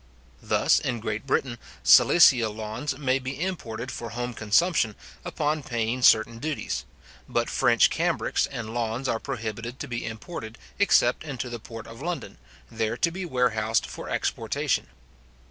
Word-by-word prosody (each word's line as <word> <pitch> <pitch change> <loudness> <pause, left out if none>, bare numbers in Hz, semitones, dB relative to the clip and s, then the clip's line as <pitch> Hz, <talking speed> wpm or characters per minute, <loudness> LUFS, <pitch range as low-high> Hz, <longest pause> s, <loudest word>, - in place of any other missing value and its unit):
Thus, - - +3
in 120 -2 -2
Great 110 +3 -4
Britain, 125 -3 0 0.2
Silesia 125 -9 +7
lawns 110 +6 -4
may 135 -2 +1
be 130 +2 -6
imported 130 -10 -4
for 120 -2 -6
home 120 +1 -4
consumption, 110 - +2 0.3
upon 150 +1 -1
paying 120 -2 -2
certain 115 -1 +5
duties; 155 +2 -3 0.4
but - - 0
French - - +4
cambrics - - 0
and 115 -1 -6
lawns 120 +2 -2
are 115 - 0
prohibited 115 +3 -5
to 150 - -5
be 120 -2 -4
imported, 115 0 -7 0.2
except 125 -11 +4
into 130 -5 -5
the 120 - -5
port 115 +1 -9
of 115 +3 -11
London, 175 +2 -5 0.3
there 110 0 -1
to 170 - +1
be 185 +2 -5
warehoused 115 -6 +1
for - - -8
exportation. - - -1
120 Hz, 145 wpm, -26 LUFS, 115-140 Hz, 0.4 s, Silesia